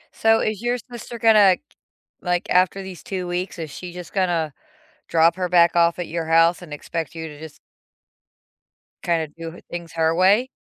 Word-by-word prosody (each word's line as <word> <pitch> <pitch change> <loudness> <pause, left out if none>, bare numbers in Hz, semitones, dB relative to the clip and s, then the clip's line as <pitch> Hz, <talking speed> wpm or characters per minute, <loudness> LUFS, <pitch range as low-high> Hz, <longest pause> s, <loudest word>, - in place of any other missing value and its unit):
So, 225 0 +4
is 215 -2 -2
your 240 +1 0
sister 240 0 -8
gonna 210 -5 +6 0.6
like, 180 -1 -1
after 185 +2 +3
these 185 -5 -9
2 185 -2 -4
weeks, 180 +1 -3
is 160 -3 -5
she 180 +3 -8
just 180 -1 -9
gonna 170 -6 0 0.5
drop 165 +1 +4
her 180 -1 -1
back 170 -1 +4
off 170 0 +3
at 175 - -3
your 165 0 -3
house 165 +2 +4
and 165 -4 -9
expect 165 +1 -5
you 160 0 -5
to 150 - -12
just 155 -1 -10 1.5
kinda 165 -2 0
do 165 0 -7
h - - -14
things 170 -1 -7
her 165 0 +1
way? 200 +8 +4
175 Hz, 180 wpm, -22 LUFS, 165-190 Hz, 1.5 s, gonna